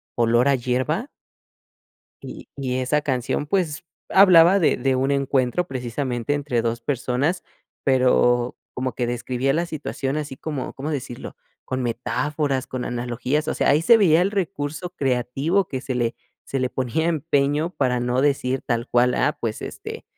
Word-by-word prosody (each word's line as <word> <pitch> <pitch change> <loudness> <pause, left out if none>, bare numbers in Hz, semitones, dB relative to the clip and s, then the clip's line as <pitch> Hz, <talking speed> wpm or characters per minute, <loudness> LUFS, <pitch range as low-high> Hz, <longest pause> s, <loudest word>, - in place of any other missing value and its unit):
Olor 120 +2 +3
a 140 - +4
Hierba 130 - -1 1.2
y - - -9
y 130 -2 -2
esa 140 +4 +1
canción 130 +1 -1
pues 170 -2 -1 0.2
hablaba 185 -1 +7
de - - +3
de 135 +1 +1
un 135 +2 +1
encuentro 140 +3 +1
precisamente 125 0 -2
entre 140 -5 -1
2 115 0 -1
personas 135 +6 -1 0.4
pero 125 -2 +3 0.2
como 130 -2 -3
que 120 - -1
describía 125 +2 -1
la 170 +4 0
situación 145 -3 -3
así 145 -3 -4
como, 150 -3 -5
¿cómo 140 +3 -4
decirlo? 125 -5 -6 0.3
con 130 0 -2
metáforas, 135 +3 -1
con 125 -1 -4
analogías. 125 +5 -2
O - - 0
sea, - - +1
ahí 150 +3 +3
se 230 +8 +7
veía 170 -4 +5
el 190 - +1
recurso 165 -4 -3
creativo 140 +5 0
que 130 - -4
se 130 - -3
le 120 -1 0 0.3
se 135 - -3
le 130 - 0
ponía 130 +6 -1
empeño 150 -1 +1
para 125 -3 +1
no 125 +1 0
decir 135 -2 +1
tal 120 0 -1
cual: 125 +1 +3
"Ah 145 +2 +1
pues 110 -2 -3
este - - -7
135 Hz, 160 wpm, -23 LUFS, 125-150 Hz, 1.2 s, hablaba